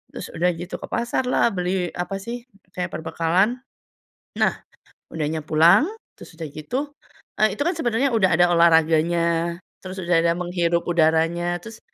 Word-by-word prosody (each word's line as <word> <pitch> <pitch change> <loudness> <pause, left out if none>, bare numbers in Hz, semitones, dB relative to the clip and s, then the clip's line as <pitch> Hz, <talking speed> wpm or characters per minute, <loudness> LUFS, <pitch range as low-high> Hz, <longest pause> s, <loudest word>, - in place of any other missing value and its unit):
Terus - - -7
udah 175 +2 0
gitu 175 +2 -7
ke - - -8
pasarlah, 240 +1 0
beli 180 -1 -2
apa, 180 +2 -4
sih, 240 +2 -7 0.2
kayak 180 -1 -3
perbekalan. 175 +8 0 0.8
Nah, - - +2 0.5
udahnya 155 0 -3
pulang, 165 - +5 0.3
terus 160 - -13
udah 160 -1 -6
gitu 255 - -4 0.5
eee, 215 - +3
itu, - - -6
kan, 345 - +1
sebenernya 255 0 +1
udah 215 -5 +3
ada 175 +1 +4
olahraganya, 170 0 +3 0.2
terus 185 0 -7
udah 170 -1 +3
ada 170 0 +2
menghirup 175 -1 0
udaranya, 170 +1 +1
terus 225 0 -10
175 Hz, 145 wpm, -23 LUFS, 165-205 Hz, 0.8 s, pulang